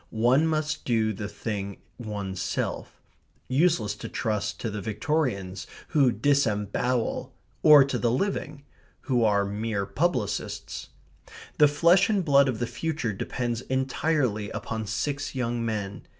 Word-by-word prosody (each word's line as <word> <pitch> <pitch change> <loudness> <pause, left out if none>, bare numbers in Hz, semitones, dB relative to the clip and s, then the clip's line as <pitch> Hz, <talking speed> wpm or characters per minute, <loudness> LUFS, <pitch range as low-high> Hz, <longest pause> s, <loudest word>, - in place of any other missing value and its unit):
One 125 +8 +3
must 155 0 -1
do 110 -3 +1
the 105 +1 -5
thing 100 -1 -5 0.2
oneself. 100 -5 -4 0.5
Useless 130 -7 +2
to - - -7
trust 105 -4 -2
to 115 - -2
the 105 -1 -4
Victorians, 105 - -2 0.2
who 140 -6 +4
disembowel, 115 -1 0 0.3
or 150 -2 +9
to 130 -2 -2
the 120 - +2
living, 150 - -2 0.4
who 125 -4 +1
are 100 -2 +3
mere 105 0 -2
publicists. 160 - -2 0.7
The 150 - +8
flesh 170 +8 +4
and 200 -5 +1
blood 140 -2 +5
of 125 - -2
the 120 - -1
future 150 -4 -3
depends 120 +4 -3
entirely 130 -4 0
upon 110 -1 -4
six 140 +7 -2
young 120 -2 -1
men. 105 -3 -4
120 Hz, 130 wpm, -26 LUFS, 105-145 Hz, 0.7 s, or